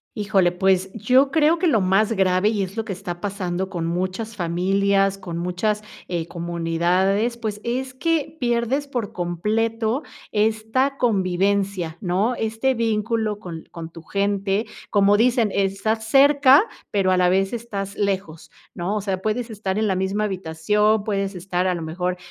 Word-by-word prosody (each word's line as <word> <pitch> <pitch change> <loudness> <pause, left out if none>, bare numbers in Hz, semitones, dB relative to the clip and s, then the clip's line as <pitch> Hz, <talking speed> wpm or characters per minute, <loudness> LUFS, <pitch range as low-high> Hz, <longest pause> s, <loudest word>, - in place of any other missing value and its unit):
Híjole, 200 -4 +2
pues, 190 +1 +1
yo 255 +6 +3
creo 315 +3 +3
que 360 - +2
lo 260 -9 +3
más 195 +4 +2
grave, 190 0 +2
y 210 -3 0
es 190 +1 -6
lo 225 - -2
que 200 - -4
está 175 -2 -6
pasando 190 -2 -3
con 175 -4 -3
muchas 185 +6 -3
familias, 195 +2 +1
con 170 -3 -6
muchas, 180 +5 -1 0.2
eh, 170 -2 -3
comunidades, 175 +7 0
pues, 215 -2 -4
es 255 +2 -2
que 320 +3 -1
pierdes 240 +3 0
por 240 -7 -3
completo 220 - -1 0.3
esta 220 +6 +1
convivencia, 195 -5 0
¿no? 195 +6 +1
Este, 225 +4 0
vínculo 225 -2 0
con 165 -5 -8
con 165 -1 -8
tu 165 - -11
gente, 200 +3 -1 0.2
como 205 0 +4
dicen, 235 -2 +3
estás 200 +3 0
cerca 280 - +6 0.3
pero 195 -2 +2
a 185 - +3
la 180 -1 +4
vez 190 +2 +1
estás 205 -4 -5
lejos, 190 -5 -2 0.2
¿no? 180 +4 -2
O 210 - -1
sea, 190 -2 -2
puedes 225 +3 -2
estar 200 -2 -3
en 220 - +1
la 190 - +1
misma 190 +3 -1
habitación, 200 +3 +1
puedes 195 -2 -2
estar, 180 0 -1
a 180 - +1
lo 170 - -5
mejor 180 +3 -2
200 Hz, 160 wpm, -22 LUFS, 185-225 Hz, 0.3 s, cerca